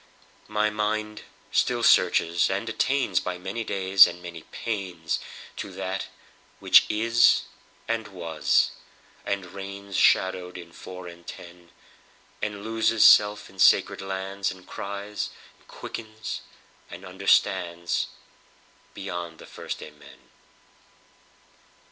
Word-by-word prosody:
My 105 0 +1
mind 105 0 -2 0.3
still - - +1
searches, 85 +1 +4
and 100 +4 -2
attainsBy 105 -7 0
many 95 +5 -4
days 95 -2 +6
and - - -7
many 85 -2 -9
painsTo 95 -8 -3 0.5
That 95 0 -3 0.5
which - - +6
Is 115 +2 +4 0.4
and 115 -1 -1
Was 80 -7 +1 0.6
and 100 -1 -1
reignsShadowed 95 -1 0
in 85 -1 -11
four 90 +1 -10
and 85 0 -12
ten; 85 0 -11 0.7
And 105 -1 -4
loses 115 0 +2
self 105 0 +6
in 95 - -17
sacred - - +4
lands, 95 +1 -3
And 95 -1 -13
cries 100 +1 -5 0.3
and - - -27
quickens, 110 -1 -7 0.5
and - - -10
understandsBeyond 85 -2 +1 1.3
the - - -12
first - - -7
Amen. 75 -1 -15
95 Hz, 100 wpm, -26 LUFS, 90-105 Hz, 1.3 s, days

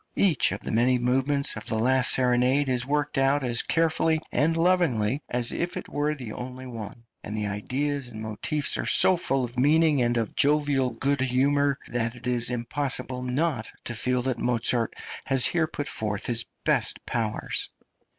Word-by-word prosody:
Each 180 -9 +3
of - - -5
the - - -6
many 125 +3 +2
movements 135 +3 +1
of 105 - -7
the 110 - -1
last 130 +3 +3
serenade 130 +2 +3
is 125 -1 +1
worked 145 -1 -1
out 135 +1 +2
as 120 -2 +3
carefully 160 -1 +1
and 165 +3 +1
lovingly 155 -9 +1
as 120 -1 0
if 175 +1 -3
it - - -7
were 150 +1 -2
the 125 -6 -8
only 130 +1 -8
one, 115 -2 -9 0.2
and 105 +1 -5
the 105 - -2
ideas 130 +7 -3
and 110 -3 -10
motifs 110 +7 0
are - - -3
so 185 - +7
full 135 -6 0
of 120 0 -5
meaning 150 +1 +3
and 120 0 0
of 115 -2 -3
jovial 145 -3 +1
good 135 +3 -2
humour 140 +2 +1
that 120 0 -2
it 120 - -13
is 120 -1 +1
impossible 125 +1 -1
not 125 -1 -2 0.2
to 120 - -4
feel 125 +2 -1
that 130 -2 -2
Mozart 120 -1 -1 0.3
has 135 -2 +3
here 165 -2 +1
put 145 -2 -6
forth 105 -1 -2
his 115 -1 +1 0.2
best - - +1
powers. 110 -2 -1
130 Hz, 180 wpm, -25 LUFS, 120-145 Hz, 0.3 s, so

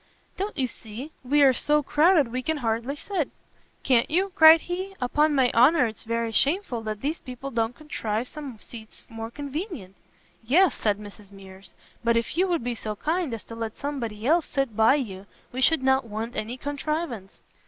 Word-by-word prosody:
"Don't 400 -1 -4
you 265 - +2
see? 240 +4 -8
we 285 +3 +3
are 265 -2 +6
so 295 +4 +2
crowded 300 -3 +3
we 255 +1 -2
can 315 +4 -1
hardly 235 +1 -2
sit." 340 0 -3 0.5
"Can't 245 -3 +3
you?" 370 +5 +1
cried 320 -2 +8
he, 375 +2 -5
"upon 295 +4 +2
my 255 -3 +3
honour 255 +4 +5
it's 220 -2 -6
very 230 0 -1
shameful 275 - +1
that 215 -1 -5
these 305 +4 -2
people 255 +1 -8
don't 230 0 -1
contrive 235 -6 -3
some 280 -6 -8
seats 220 0 -13
more 225 0 -6
convenient." 290 - -6 0.5
"Yes," 315 +8 +4
said 210 -2 0
Mrs 205 -1 -12
Mears; 195 -1 -13 0.3
"but 235 0 +3
if 230 +4 -1
you 370 +3 +2
would 345 -8 0
be 245 0 -1
so 215 -2 -5
kind 320 - -1
as 225 -2 -5
to - - -11
let 225 -1 -5
somebody 235 -7 -4
else 325 +4 +3
sit 270 -6 -2
by 225 +5 +5
you 200 -8 -5 0.2
we 260 - -4
should 305 +1 +3
not 265 -1 +3
want 225 +3 -5
any 230 +4 -4
contrivance." 285 - -4
255 Hz, 185 wpm, -25 LUFS, 225-300 Hz, 0.5 s, cried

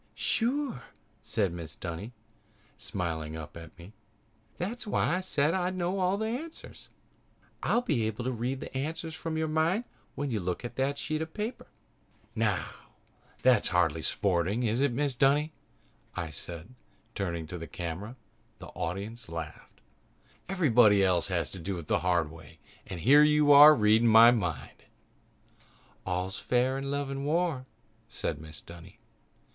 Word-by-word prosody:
"Sure!" 250 - 0 0.4
said 100 -5 0
Mrs. 80 -2 -8
Dunny, 85 +6 -5 0.6
smiling 85 -7 -4
up 80 -2 -8
at 85 0 -11
me. 85 +5 -13 0.6
"That's 220 +6 -4
why 180 -3 +1
I - - -2
said 155 -4 +1
that 190 - 0
I'd 180 +1 -1
know 185 +1 0
the 220 - -2
answers. 275 +9 -7 0.7
I'll 240 - +1
be 120 - 0
able 110 +2 -4
to 130 - -1
read 125 +3 -3
the - - -8
answers 160 +4 -3
from 160 0 -4
your 160 0 0
mind 160 +8 +1 0.3
when 145 -1 -3
you 110 - 0
look 90 +5 -3
at 120 - -7
that 135 +2 0
sheet 155 +2 -3
of 160 0 -6
paper." 220 +3 -4 0.7
"Now, - - 0 0.8
that's 125 -5 +5
hardly 80 -3 +1
sporting, 95 +6 0
is 115 +2 +1
it, 140 -2 +3
Mrs. 135 0 -1
Dunny?" 145 +3 +3 0.6
I 85 -3 -4
said, 85 - -9 0.4
turning 85 -4 -3
to 85 +3 -7
the 80 - -7
camera. 90 +7 -6 0.4
The - - -10
audience 105 +7 -5
laughed. 80 -2 -8 0.7
"Everybody 120 - +5
else 90 -2 +2
has 85 -5 -1
to 95 - -8
do 95 +2 -4
it 85 - -7
the - - +1
hard 85 -4 +1
way 80 0 -14 0.3
and 90 -3 -6
here 140 - +7
you 150 -1 +5
are 145 +2 +10
reading 110 +1 +4
it - - +5
from - - +4
my 115 +2 +9
mind." 90 - -3 1.2
"All's 90 +1 -2
fair 130 +2 +1
in 140 0 -4
love 140 -1 -2
and 135 0 -4
war," 155 -3 0 0.4
said 75 -3 -3
Mrs. 75 0 -11
Dunny. 85 0 -13
120 Hz, 160 wpm, -29 LUFS, -, 1.2 s, are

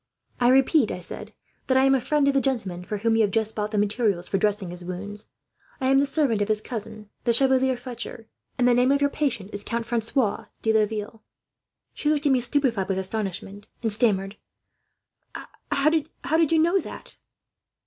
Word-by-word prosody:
"'I 240 - +3
repeat,' 270 -1 +4
I - - -4
said, 175 - -9 0.4
'that 260 - +3
I 265 - +5
am 270 0 +5
a 265 - +2
friend 295 +2 +1
of 280 - +3
the 275 - +2
gentleman 200 -10 -2
for 210 +4 -4
whom 225 +2 +1
you 225 - +3
have 210 - +3
just 220 +1 -1
bought 210 0 -2
the 215 - -3
materials 205 -3 +1
for 195 - 0
dressing 205 -3 0
his 180 0 -7
wounds. 205 +4 -7 0.5
I 260 -1 0
am 270 - +5
the 280 - +2
servant 275 -8 +1
of 205 - +1
his 215 -1 +1
cousin, 215 -2 -7
the 240 - +2
Chevalier 265 0 +4
Fletcher; 240 -2 -8 0.3
and 245 - +3
the 245 - +5
name 250 +2 +3
of 280 - +3
your 285 0 +1
patient 235 -10 -2
is 205 - -4
Count 230 +1 -3
Francois 230 0 -1 0.2
de 220 - +2
Laville.' 215 0 -1 0.7
"She 295 - -1
looked 300 0 0
at 285 - +4
me, 260 - +4
stupefied 240 -7 0
with 190 - 0
astonishment, 195 0 -4 0.2
and 225 -2 +1
stammered: 200 -3 +1 1.3
"'How 275 +3 +3
do 315 -2 0 0.5
you - - +4
know 340 +5 +3
that?' - - -9
225 Hz, 200 wpm, -25 LUFS, 205-265 Hz, 1.3 s, I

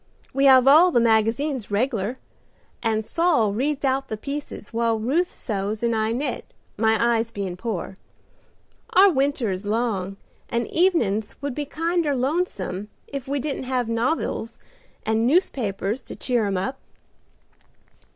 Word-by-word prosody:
We 275 +1 +2
have 260 -1 +7
all 320 +6 +8
the 250 - +3
magazines 230 +3 +1
reg'lar, 220 +1 -1 0.6
and 220 -1 0
Saul 310 - +2
reads 280 +5 -1
out 270 0 +1
the 220 - -4
pieces 280 -3 -6
while 230 0 +1
Ruth 295 +11 +1
sews 210 0 -3
and 235 -1 +2
I 220 0 0
knit, 255 +2 -2 0.3
my 220 +1 +3
eyes 230 -1 +2
bein' 195 -5 -4
poor. 190 -2 -4 1.0
Our 390 +1 +7
winter 270 - 0
is 190 +2 -5
long 205 -4 -1 0.3
and 235 0 0
evenins 235 - +1
would 285 -2 -2
be 290 +2 -4
kinder 330 -1 0
lonesome 250 - -2 0.2
if 275 -2 -6
we 280 +1 -1
didn't 275 -1 -3
have 250 -1 0
novils 230 -1 -1 0.5
and 220 +1 +2
newspapers 240 - 0
to - - -9
cheer 240 -5 0
'em 195 -1 -1
up." 230 +9 -3
235 Hz, 140 wpm, -24 LUFS, 215-280 Hz, 1.0 s, all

